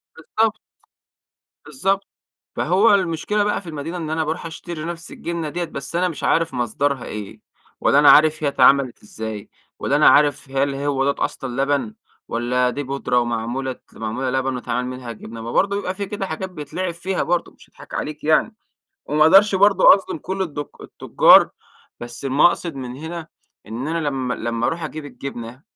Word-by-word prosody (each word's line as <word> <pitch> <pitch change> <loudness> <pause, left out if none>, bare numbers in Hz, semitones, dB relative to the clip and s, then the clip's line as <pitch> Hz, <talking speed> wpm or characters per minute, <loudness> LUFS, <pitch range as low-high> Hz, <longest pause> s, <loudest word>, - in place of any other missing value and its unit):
بالضبط، 215 +7 -1 1.0
بالضبط 195 -5 -1 0.5
فهو 190 +7 +3
المشكلة 190 +3 0
بقى 210 - 0
في 180 - -10
المدينة 160 +3 -5
إن 160 -3 -5
أنا 160 0 0
باروح 160 +3 -4
أشتري 165 -1 -7
نفس 170 0 -6
الجنة 170 -2 -4
ديّة، 175 +4 -3
بس 155 -1 -6
أنا 180 +1 +2
مش 165 - -8
عارف 165 -2 +1
مصدرها 130 +2 -1
إيه! 105 -2 -7 0.4
ولا 140 - +4
أنا 145 - +8
عارف 155 +1 +5
هي - - +2
اتعملت 135 -2 +3
إزاي! 110 -1 -7 0.3
ولا - - 0
أنا - - +6
عارف، 145 -2 +3
هل 135 +1 0
هو 140 -1 0
دَوّة - - -1
أصلًا 135 0 -4
لبن؟! 145 +10 -1 0.3
ولا 125 +2 0
دي 145 +3 -4
بُودرة 135 -2 0
ومعمولة 120 +3 -2
ت - - -24
معمولة 115 +4 -3
لبن 130 0 -1
واتعمل 125 0 -3
منها 125 -2 -6
جبنة؟! 115 0 -9
ما 115 +1 -5
برضو 195 +7 +2
يبقى 185 -2 -4
في 200 +1 -3
كده 200 0 -4
حاجات 190 +2 -5
بيتلعب 175 +2 -4
فيها 185 +3 -2
برضو 175 +1 -1
مش - - -21
هاضحك - - -15
عليك 150 0 -4
يعني، 160 +8 +2 0.5
وما 150 +1 +2
أقدرش 195 +6 +6
برضو 200 +1 +4
أظلم 195 -4 +5
كل 190 +5 -3
الدك 145 -5 -6
التجار، - - +5 0.5
بس 120 +2 -7
المقصد 150 +4 +2
من 125 -2 -6
هنا 160 +2 -7 0.4
إن 115 +6 -5
أنا 165 +1 -1
لما 130 -3 -2
لما 115 +1 -2
أروح 165 0 -2
أجيب 155 0 -6
الجبنة 125 -2 -8
145 Hz, 175 wpm, -21 LUFS, 125-170 Hz, 1.0 s, أنا